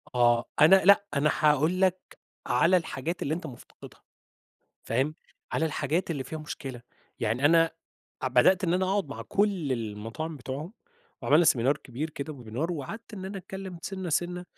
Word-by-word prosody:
آه، 120 -1 +4 0.2
أنا 160 +6 +9
لأ، 200 +1 +6
أنا 145 +1 +2
هاقول 155 +4 +3
لك 185 -1 0 0.3
على 165 +10 +4
الحاجات 165 0 -4
اللي 150 - -1
أنت 165 -1 -4
مفتقدها، 120 -4 -13 0.8
فاهم؟ 135 +7 0 0.4
على 160 - +1
الحاجات 160 +3 -1
اللي 140 -5 -3
فيها 160 +5 -6
مشكلة، 135 -5 -7 0.4
يعني 115 +5 -1
أنا 165 +2 +5 0.5
ع 130 - +1
بدأت 150 +10 +4
إن 170 -1 +2
أنا 185 +1 +1
أقعد 195 -5 0
مع 140 - -6
كُل 195 -9 0
المطاعم 115 +7 -5
بتوعهم 140 - -6 0.5
وعملنا 155 +4 +5
seminar 135 +1 +3
كبير 140 +6 -4
كده 150 +1 -6
وwebinar 125 +6 -4
وقعدت 200 - -6
إن 190 -2 -7
أنا 195 +1 -5
أتكلم 190 -1 -8
سِنّة 190 -1 -5
سِنّة 175 +3 -1
155 Hz, 160 wpm, -28 LUFS, 130-180 Hz, 0.8 s, أنا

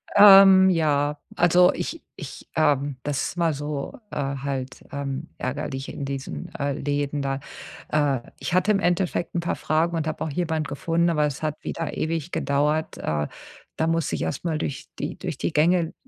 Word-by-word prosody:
Ähm, 195 -2 +9
ja. 150 -4 +1 0.2
Also, 175 +1 +5
ich 330 - -5
ich, - - -9
ähm 145 -3 +2
das 145 -2 -1
ist - - -4
immer 165 -2 +2
so, 145 0 -4 0.2
äh, - - -5 0.3
halt, 135 -2 -4
ähm, 140 +2 -4
ärgerlich 135 0 -4
in 140 - -5
diesen, 135 - -5
äh, 140 0 -1
Läden 145 +1 -2
da. 135 0 -1 0.5
Äh, 145 -4 +2 0.2
ich - - -4
hatte 185 +3 +3
im 200 - +3
Endeffekt 175 -2 0
'n 175 - 0
paar 170 - -1
Fragen 165 +2 0
und 160 - -1
habe 155 - -3
auch 160 - -2
jemanden 160 0 -1
gefunden, 165 +4 0
aber 150 -3 +2
es 145 -1 -3
hat 155 -1 -3
wieder 165 - -4
ewig 165 +1 -2
gedauert. 150 +3 0
Äh, 75 -1 -1 0.5
da 160 - +1
musste 165 -1 0
ich - - -4
erstmal 155 +2 -2
durch 140 -4 -4
die - - -4
durch - - -5
die - - -1
Gänge, 165 +2 +3
155 Hz, 180 wpm, -24 LUFS, 140-170 Hz, 0.5 s, Ähm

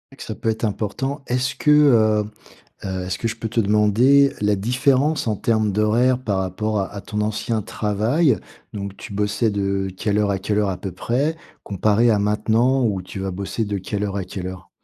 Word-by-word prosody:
que - - -9
ça 110 - -6
peut - - -6
être 110 +1 -2
important. 120 +7 -2
Est-ce 125 +1 0
que, - - -1
heu 115 -8 +5 0.6
heu, 95 -1 -3
est-ce 95 +1 -3
que 115 - -1
je 110 - -4
peux 115 - -4
te 115 +1 0
demander 110 +7 +4
la 105 -1 +2
différence 135 +5 +1
en 105 - 0
termes 110 -2 +1
d'horaires 115 +5 +2
par 105 -7 -2
rapport 100 +3 -1
à 95 - -4
à 100 - -6
ton 105 +1 -4
ancien 110 +1 -1
travail? 110 - +1 0.4
Donc, 100 -1 -6
tu - - -9
bossais 105 +3 0
de 100 -1 -1
quelle 105 +1 0
heure 105 -1 +2
à 95 - -1
quelle 105 +2 -1
heure, 105 -2 +1
à 95 - -3
peu 95 +1 -6
près, 135 - -1 0.3
comparé 105 +4 +2
à 105 - +3
maintenant 115 +5 +2
où 100 -4 0
tu 95 +1 -8
vas 95 0 -2
bosser 100 +4 -3
de 100 -1 -3
quelle 100 +2 -4
heure 100 -1 -2
à 95 - -2
quelle 90 0 -6
heure? 95 -1 -10
105 Hz, 210 wpm, -21 LUFS, 100-120 Hz, 0.6 s, heu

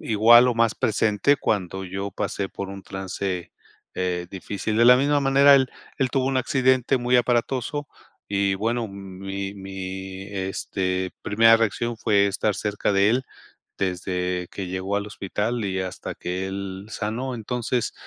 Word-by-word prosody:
igual 120 +3 +6
o 120 - +1
más 115 -1 +2
presente 110 +5 +2
cuando 95 -4 -2
yo 95 +2 -4
pasé 100 0 -3
por 100 -1 -6
un 100 0 -8
trance, 95 -1 -4 0.4
eh, 90 -1 -2
difícil. 100 +3 -4
De 115 - +5
la 125 +1 +8
misma 145 +2 +2
manera, 140 +1 +6
él 130 -1 +4 0.3
él 130 -3 +1
tuvo 130 -1 +1
un 135 -1 0
accidente 130 0 +2
muy 125 0 0
aparatoso 125 +4 0 0.4
y 100 -1 +1
bueno, 115 +2 -1
mi 95 0 -6
mi, 95 0 -6
este, 95 -1 -2
primera 115 +2 +5
reacción 115 +1 -1
fue 105 -3 +3
estar 100 +1 0
cerca 105 0 -1
de 100 +2 +4
él 130 +2 +1 0.6
desde 90 -1 -2
que 95 -2 -5
llegó 95 +2 -2
al 100 +1 -2
hospital 105 +3 -2
y 95 -1 -2
hasta 95 -1 -5
que 90 +2 -3
él 95 0 -5
sanó. 120 +4 -3
Entonces, 120 +1 -2
100 Hz, 155 wpm, -24 LUFS, 95-120 Hz, 0.6 s, la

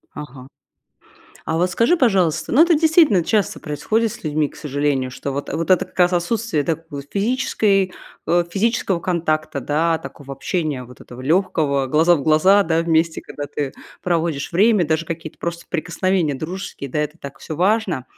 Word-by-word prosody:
Ага. 135 -3 -9 1.0
А 160 - -1
вот 180 +2 +1
скажи, 230 - +3
пожалуйста, 195 - +1
ну 290 +6 +7
это 340 -1 +4
действительно 310 - +4
часто 210 -4 0
происходит 215 +9 -1
с - - -11
людьми, 150 -1 0
к - - -17
сожалению, 145 -3 -1
что 140 - -5
вот, 140 +1 -4
вот 165 +3 -3
это, 185 - +4
как - - -20
раз, 180 0 +4
отсутствие, 175 -2 0
да, 160 +3 0
в 140 -1 -6
физической, 200 -3 +1 0.3
э, 175 0 +3
физического 205 -2 0
контакта 155 -5 -1
да, 160 +5 +1
такого 140 -2 -10
общения, 145 -2 -2
вот, 125 +1 -15
этого 125 +1 -11
легкого, 150 -4 +1
глаза 160 +5 +4
в 140 - -4
глаза, 185 +7 +5
да, 165 0 +1
вместе, 165 -1 +1
когда 145 - -7
ты 140 -1 -4 0.3
проводишь 165 -3 -1
время, 200 -1 +4
даже 160 +1 0
какие-то 165 -1 -6
просто 170 0 -4
прикосновения 170 -1 0
дружеские, 155 -2 -6
да, 150 - -2
это 150 +1 -2
так 140 -3 -9
всё 155 - -7
важно. 185 - +1
165 Hz, 170 wpm, -20 LUFS, 150-190 Hz, 1.0 s, ну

